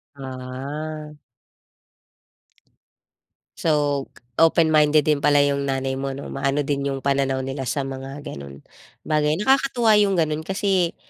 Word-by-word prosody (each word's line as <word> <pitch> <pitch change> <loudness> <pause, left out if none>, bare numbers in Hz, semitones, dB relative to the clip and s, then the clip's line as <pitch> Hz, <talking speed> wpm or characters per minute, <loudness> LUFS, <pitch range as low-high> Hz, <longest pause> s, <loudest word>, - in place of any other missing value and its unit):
Ah. 140 +4 -6 2.5
So, 145 -3 +1 0.3
open-minded 155 -2 +4
din 150 -2 +2
pala 145 0 +4
'yong 140 -1 0
nanay 135 0 -2
mo, 135 -1 -3
'no? 140 - -7
Maano 140 +1 0
din 140 0 -1
'yong 135 -1 -4
pananaw 135 -1 +1
nila 135 -1 -4
sa 140 - -1
mga 135 +1 -7
gano'n 70 0 -9 0.4
bagay. 150 0 +1
Nakakatuwa 260 -4 +3
'yong 200 -2 +3
gano'n 155 -2 +1
kasi, 190 -3 0
145 Hz, 120 wpm, -23 LUFS, 135-155 Hz, 2.5 s, open-minded